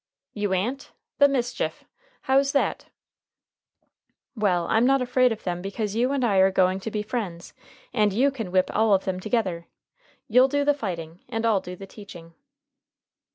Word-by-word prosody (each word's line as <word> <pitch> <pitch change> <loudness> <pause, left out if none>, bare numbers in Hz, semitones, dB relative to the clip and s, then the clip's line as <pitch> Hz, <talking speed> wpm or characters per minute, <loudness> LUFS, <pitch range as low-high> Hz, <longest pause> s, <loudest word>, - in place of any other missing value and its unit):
"You 205 -2 -2
a'n't! 235 +10 -2 0.3
The 285 - +7
mischief! 255 -3 -2 0.4
How's 275 +1 +2
that?" 280 - 0 1.5
"Well, 185 -6 +1
I'm 225 +1 +3
not 270 +2 +4
afraid 250 0 +2
of 225 - -5
them 175 -1 -3
because 200 +2 -4
you 245 +3 +1
and 275 -3 0
I 200 -4 +2
are 190 0 +6
going 185 0 +2
to 210 - -5
be 210 -1 -3
friends, 200 -7 -5 0.4
and 210 -3 +2
you 260 +8 +2
can 225 -9 -6
whip 185 0 +2
all 215 -1 +4
of 190 - -2
them 185 -1 -2
together. 185 -6 -2 0.6
You'll 250 +4 +5
do 285 +1 0
the 290 - +4
fighting 175 - -6
and 225 -2 -2
I'll 215 -4 +3
do 180 - -8
the 195 - -10
teaching." 180 -5 -12
210 Hz, 170 wpm, -25 LUFS, 185-250 Hz, 1.5 s, The